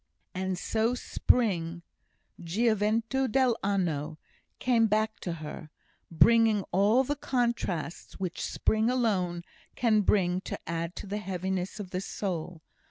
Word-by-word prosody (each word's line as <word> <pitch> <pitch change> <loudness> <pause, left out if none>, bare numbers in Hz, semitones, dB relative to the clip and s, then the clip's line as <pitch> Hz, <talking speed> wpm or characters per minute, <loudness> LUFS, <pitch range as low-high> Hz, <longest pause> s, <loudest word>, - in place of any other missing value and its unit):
And 185 0 -2
so 225 +5 0
spring 175 -9 0 0.6
(gioventu 225 +6 +1
dell'anno) 195 - +1 0.4
came 235 -3 +3
back 215 +1 0
to 175 - -3
her, 155 -1 -8 0.4
bringing 220 +3 +4
all 205 +8 +4
the 290 +3 -2
contrasts 235 - -2
which 180 -2 -3
spring 220 +1 +1
alone 190 -9 0 0.3
can 220 -3 +3
bring 185 -3 +2
to - - -5
add 170 +1 -3
to - - -7
the 205 +2 -3
heaviness 190 +1 -3
of 190 -3 -7
the 185 - -2
soul. 175 -5 -4
200 Hz, 120 wpm, -29 LUFS, 175-225 Hz, 0.6 s, bringing